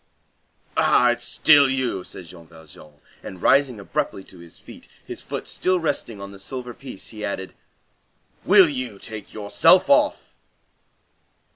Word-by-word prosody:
"Ah! 125 0 +4
It's 120 0 -3
still 145 -3 +5
you!" 130 -8 -2
said 95 - -9
Jean 85 -1 -14
Valjean, 80 -2 -16 0.3
and 95 - -10
rising 135 +1 +2
abruptly 95 -1 -4
to 90 - -16
his 85 -1 -14
feet, - - -15 0.2
his - - -8
foot - - -7
still 185 0 0
resting 140 -9 -3
on 100 0 -9
the 100 - -13
silver 125 +4 -7
piece, 130 -5 -9
he 105 -2 -9
added:— 95 -2 -5 0.9
"Will 190 -1 +6
you 130 -7 -5
take 110 +1 -9
yourself 105 -1 +3
off!" - - +2
110 Hz, 145 wpm, -22 LUFS, 95-135 Hz, 0.9 s, Will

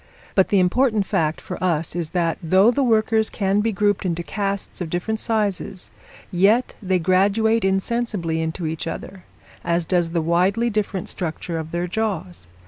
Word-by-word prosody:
But 190 - +3
the 200 - +4
important 215 +3 +2
fact 155 -3 0
for - - -7
us 165 -3 0
is 170 -3 -2
that, 170 -1 0
though 190 +7 +4
the 280 - 0
workers 220 -2 +2
can 195 0 0
be 225 +1 0
grouped 205 0 +1
into 170 -2 -2
castes 200 0 -3
of 170 - -3
different 195 +6 -2
sizes, 205 -4 -2 0.4
yet 205 +8 +3
they 190 -2 +1
graduate 200 +5 +2
insensibly 195 -4 -1
into 160 +2 -3
each 160 +1 -3
other, 185 +2 -7 0.4
as 170 0 0
does 175 -1 +1
the 170 0 -1
widely 185 +8 +2
different 205 -3 -2
structure 165 -1 -4
of 160 0 -6
their 170 +1 -2
jaws. 180 - -3
190 Hz, 165 wpm, -22 LUFS, 170-215 Hz, 0.4 s, the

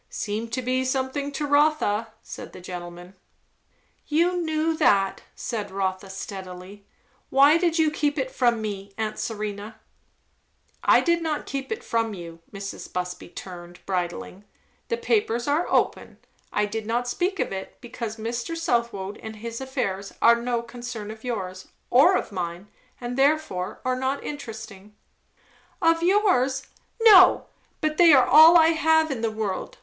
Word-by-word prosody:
"Seem 215 +2 -3
to 235 +3 -4
be 255 +1 0
something 265 +2 -2
to 295 +1 -2
Rotha," 285 -7 +2 0.2
said - - -9
the - - -10
gentleman. 175 0 -8 0.9
"You 340 +4 +2
knew 320 0 0
that," 195 -6 +2
said 215 -4 -4
Rotha, 190 0 -3
steadily. 190 0 -8 0.4
"Why 280 +4 +6
did 340 -2 +1
you 315 -2 +3
keep 295 -1 -1
it 260 -2 -2
from 240 -3 +1
me, 200 -1 -6
aunt 215 -1 -3
Serena?" 215 0 -5 1.0
"I - - +5
did 340 -1 +1
not 315 -2 -2
keep 275 +3 -5
it 450 - -4
from 225 -2 -1
you," 170 -2 -9
Mrs. 200 -1 -7
Busby 180 0 -4
returned, 175 -1 -10
bridling. 180 +1 -4 0.4
"The 465 - -1
papers 410 - 0
are 295 +5 +1
open. - - 0 0.3
I 210 - +1
did 215 +1 -5
not 240 +2 -1
speak 360 +9 -1
of - - -1
it, 190 0 -7
because 235 -3 -6
Mr. 235 +8 -4
Southwode 235 -9 -1
and 220 0 -8
his 230 +3 -7
affairs 200 -8 -3
are 235 0 +5
no 240 -1 -1
concern 235 -3 -7
of 220 0 -12
yours, 185 -7 -5 0.2
or 295 +10 +6
of - - -5
mine, 180 +1 -5 0.3
and 245 +1 -4
therefore 275 -11 +1
are 255 0 +1
not 265 +2 -2
interesting." 220 -7 -8 0.8
"Of 330 -3 +3
yours? 345 -9 +2 0.4
No! 415 -5 +8 0.4
But 310 0 -1
they 340 -2 +7
are 260 -2 +6
all 320 +3 +8
I 325 -1 +6
have 320 -1 +3
in 250 -4 -3
the 225 - +1
world!" 215 -3 -4
235 Hz, 155 wpm, -25 LUFS, 200-295 Hz, 1.0 s, No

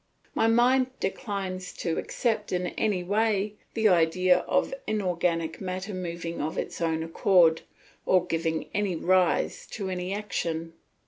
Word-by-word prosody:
My 225 - +2
mind 250 +3 +4
declines 190 -3 -3
to 165 -2 -2
accept 220 -3 -1
in 180 0 0
any 200 -5 -1
way 210 +1 +1 0.2
the 220 -1 +3
idea 180 +1 +4
of - - +1
inorganic 175 -5 -1
matter 185 +2 -4
moving 170 -2 -4
of 155 +4 -3
its - - -4
own 160 -1 0
accord, 165 0 +4 0.5
or 185 -1 +4
giving 165 -2 -1 0.4
rise 185 -1 +2
to 195 -3 -3
any 180 0 -3
action. 165 -5 -3
185 Hz, 130 wpm, -27 LUFS, 170-205 Hz, 0.5 s, mind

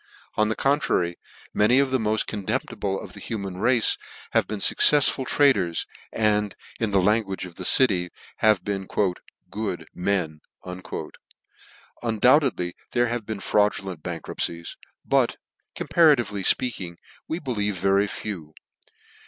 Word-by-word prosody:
On 110 0 +2
the 110 - -1
contrary, 135 - +1 0.4
many 105 +5 +4
of 135 -1 +3
the 130 - +2
mod 110 -1 +1
con 105 -2 -5
temptible 95 -1 -2
of - - -10
the - - -9
human 100 -5 -5
race 120 +1 +2 0.3
have - - +2
been 105 - -4
fuccefsful 135 +3 +4
traders, 100 - +2 0.3
and, 105 -2 +1 0.2
in 110 - 0
the 100 -1 +3
language 95 0 +1
of 90 - -10
the 90 - -7
city, 95 -9 +3 0.3
have 105 -4 +3
been 95 -1 -3 0.3
" - - -30
good 105 -4 -3
men." 90 -5 -1 1.6
Undoubtedly 120 - +3 0.2
there 120 -1 +2
have 120 -3 -3
been 110 -2 -4
fraudulent 100 -5 0
bankruptcies; 85 0 -4 0.3
but,' - - +2 0.4
compara 160 -3 +5
tively 105 -6 -3
fpeaking, 95 -9 -3 0.3
we 160 - -2
believe 105 - -2
very 100 +2 +2
few. 85 -7 -6
105 Hz, 135 wpm, -24 LUFS, 95-120 Hz, 1.6 s, compara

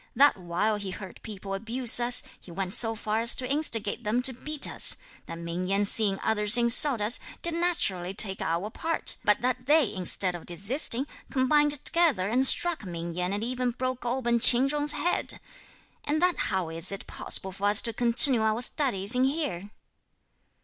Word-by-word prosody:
That 285 +4 +3
while 185 +4 -3
he 200 -2 -8
heard 190 +1 -11
people 200 -2 -9
abuse 235 +4 +1
us, 245 +1 0 0.2
he - - -18
went 185 +2 -5
so 225 -1 +2
far 215 0 -4
as 235 - +5
to 255 - -6
instigate 235 -8 -2
them 230 +4 -2
to 260 - +5
beat 300 +4 -4
us; - - +2 0.3
that 165 - -9
Ming 170 +2 -6
Yen 200 +2 -1
seeing 200 -1 +2
others 210 +1 +2
insult 240 +1 +5
us, 215 +3 +1 0.2
did 340 - -3
naturally 330 - -2
take 195 -1 -3
our 170 +6 -4
part; 330 +7 -3
but 210 0 0
that 250 0 -4
they, 295 -5 +1
instead 185 0 -2
(of 175 - -9
desisting,) 230 - +2 0.2
combined 295 +2 0
together 320 - 0
and 255 +4 +3
struck 345 -3 +4
Ming 170 -2 -8
Yen 180 +2 -4
and 205 +2 -4
even 250 +1 -3
broke 255 +1 -6
open 240 -1 -2
Ch'in 245 +3 +6
Chung's 295 +1 +1
head. 350 - -2 0.6
And 300 +2 -3
that 360 +1 0
how 190 -4 -3
is 165 +2 +4
it 195 - -8
possible 190 - -3
for 195 +2 -7
us 205 +1 +5
to 230 - -2
continue 240 +2 +5
our 220 +2 -1
studies 240 -8 -1
in 250 +1 +2
here?" 265 - -4
230 Hz, 185 wpm, -25 LUFS, 195-260 Hz, 0.6 s, Ch'in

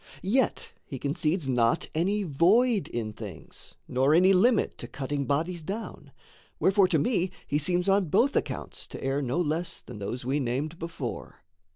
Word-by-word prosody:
Yet 235 +7 +1
he 135 - -7
concedes 150 +3 -1
not 120 -3 +2
any 195 +6 +1
void 195 - +3
in 110 -3 -4
things, 105 -7 -10
Nor 135 +4 +3
any 185 +3 +6
limit 230 +7 +3
to - - -6
cutting 140 0 -3
bodies 165 +5 -1
down. 200 +8 -6 0.5
Wherefore 195 0 +4
to 175 -3 +2
me 185 - +1 0.2
he 145 - 0
seems 175 +4 0
on 195 0 +4
both 250 - +3
accounts - - -3
To - - -9
err 135 +2 0
no 135 +4 -1
less 170 +1 -2
than 120 -4 -10
those 120 +5 -5
we 135 +3 0
named 145 +6 -2
before. 165 0 -6
160 Hz, 165 wpm, -27 LUFS, 135-190 Hz, 0.5 s, any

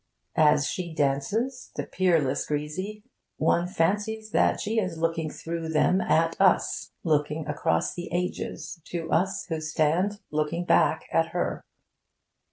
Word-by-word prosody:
As 150 -2 +5
she 170 0 -4
dances 200 - 0
the - - -3
peerless 165 -8 +1
Grisi! 185 +8 -3 0.3
one 170 +1 +2
fancies 210 +5 -1
that - - +3
she 225 +2 0
is 185 -5 -2
looking 165 -1 0
through 165 +1 -5
them 170 +4 +3
at 165 -1 +2
us, 190 -2 +3
looking 150 -1 0
across 80 - 0
the 175 -1 -6
ages 175 0 -3
to 165 -2 -5
us 185 +4 +1
who 160 -2 -2
stand 160 +6 +1
looking 155 +3 -1
back - - +3
at - - +3
her. - - -2
165 Hz, 135 wpm, -27 LUFS, 155-185 Hz, 0.3 s, As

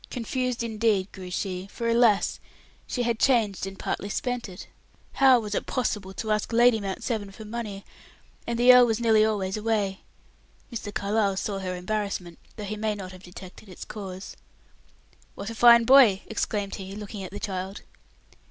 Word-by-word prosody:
Confused, 250 0 -2
indeed, 215 -4 0
grew 185 -2 -9
she: 185 0 -4
for, 235 - -4
alas! 230 -3 +3 0.5
she 245 - -2
had 235 -1 -1
changed 220 -7 +2
and 195 0 -8
partly 200 - -3
spent 245 0 -3
it. 180 - -10 0.5
How 265 -2 +6
was 210 -2 -5
it - - -2
possible 210 -6 -2
to 220 +2 -3
ask 210 +1 0
Lady 235 0 +5
Mount 195 -1 -4
Severn 215 -5 -2
for 215 +2 -11
money? 210 -3 -6 0.6
And 235 0 -1
the 245 +1 +7
earl 250 -1 +7
was 225 -1 0
nearly 220 -2 +4
always 205 -3 -1
away. 210 -3 -1 0.7
Mr. 220 -3 -5
Carlyle 200 -1 0
saw 195 0 -2
her 185 -1 -4
embarrassment, 185 -2 -4 0.2
though 215 - -7
he 210 +1 -4
may 215 0 -1
not 190 -2 -7
have 185 -1 -13
detected 185 +3 -12
its 185 - -9
cause. 190 -3 -8 1.0
"What 210 - -6
a - - -6
fine 235 +1 +7
boy!" 235 -6 +6
exclaimed 205 -2 -2
he, 195 0 -8
looking 210 -1 -7
at 185 - -6
the 205 - -6
child. 190 -1 -5
210 Hz, 175 wpm, -26 LUFS, 195-230 Hz, 1.0 s, the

